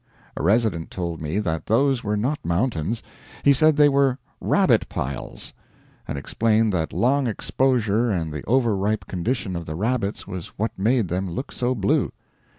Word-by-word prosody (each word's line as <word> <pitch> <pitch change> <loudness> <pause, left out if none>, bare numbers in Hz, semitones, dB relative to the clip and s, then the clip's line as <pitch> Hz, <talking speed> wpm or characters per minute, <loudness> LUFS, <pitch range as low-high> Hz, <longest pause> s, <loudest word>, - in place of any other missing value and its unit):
A - - -4
resident 100 -2 +1
told 85 -3 -4
me 80 +5 -2
that 80 -7 -2
those 130 +3 +2
were 105 0 0
not 135 +8 -1
mountains; 90 - -1 0.4
he 140 - +6
said 155 +2 +4
they 150 -1 +7
were 140 -2 +3 0.2
rabbit - - +2
piles. 70 0 -5 0.5
And - - -4
explained 110 +8 +1
that 80 -3 -1
long 135 +2 +2
exposure 120 -1 +1
and 80 -6 -1
the 75 - -5
over 120 -3 +2
ripe 105 +2 -1
condition 95 +1 -2
of 85 -1 -5
the 80 - -4
rabbits 110 +1 -1
was 95 -4 -6
what 110 +3 -1
made 110 +2 +2
them 90 +2 -2
look 90 +11 -5
so 125 +1 -1
blue. 100 -3 +1
105 Hz, 165 wpm, -23 LUFS, 90-125 Hz, 0.5 s, they